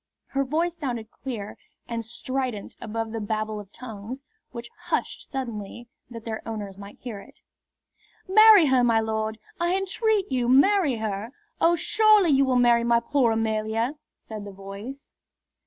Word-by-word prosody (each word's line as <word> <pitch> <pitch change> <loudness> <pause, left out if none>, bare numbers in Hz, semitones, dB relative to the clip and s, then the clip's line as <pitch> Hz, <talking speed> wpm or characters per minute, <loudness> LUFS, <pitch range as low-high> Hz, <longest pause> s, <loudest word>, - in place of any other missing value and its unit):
Her 275 0 0
voice 325 +5 -1
sounded 240 -8 -4
clear 225 -6 -7 0.3
and 230 -1 -3
strident 245 -1 -4
above 225 0 -4
the 225 - -3
babel 215 0 -2
of 200 -2 -11
tongues, 245 +2 -8 0.3
which 235 -1 -8
hushed - - -2
suddenly 235 -3 -6 0.2
that 230 -2 -9
their 220 -1 -4
owners 210 -4 -6
might 200 +1 -11
hear 230 -5 -6
it. 280 +8 -16 0.9
"Marry 425 -2 +8
her, 260 -3 +4
my 230 -2 +4
lord! 220 0 -2 0.2
I 345 +2 +2
entreat 400 - 0
you 250 -2 +1
to 250 - +4
marry 360 -2 +4
her! 220 +2 -4 0.3
Oh, 340 +1 +4
surely 420 0 +4
you 275 0 +4
will 260 -1 +1
marry 240 -1 +4
my 235 0 +4
poor 240 0 +2
Amelia!" 225 +2 0 0.2
said 215 -2 -8
the 200 - -8
voice. 200 +8 -9
235 Hz, 155 wpm, -25 LUFS, 220-275 Hz, 0.9 s, Marry